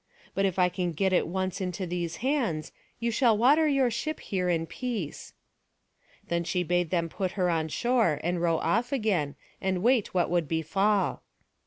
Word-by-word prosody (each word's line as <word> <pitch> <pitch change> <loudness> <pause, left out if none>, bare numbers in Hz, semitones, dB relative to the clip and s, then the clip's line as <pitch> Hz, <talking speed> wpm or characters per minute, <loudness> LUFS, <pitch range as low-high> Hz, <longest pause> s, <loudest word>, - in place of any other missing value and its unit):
But 195 - +1
if 190 -2 -1
I 180 -1 +5
can 180 -1 -2
get 190 +4 +1
it 180 - +2
once 190 +2 -2
into 185 +1 -3
these 170 -1 -3
hands, 235 - 0 0.3
you 235 0 0
shall 230 -2 +3
water 290 +8 +5
your 270 -4 +2
ship 245 +7 -3
here 180 -2 -2
in 165 -2 +1
peace." 205 - -5 0.9
Then 170 0 0
she 180 +2 -1
bade 175 0 0
them 170 -1 0
put 185 +2 -3
her 180 -3 +1
on 160 -1 0
shore, 225 - +1
and 175 +1 -1
row 165 -1 +2
off 230 +11 0
again, 200 - 0 0.3
and 190 -1 -1
wait 240 -2 +3
what 180 -2 +1
would 175 -3 +1
befall. 195 +6 +1
185 Hz, 180 wpm, -28 LUFS, 170-225 Hz, 0.9 s, I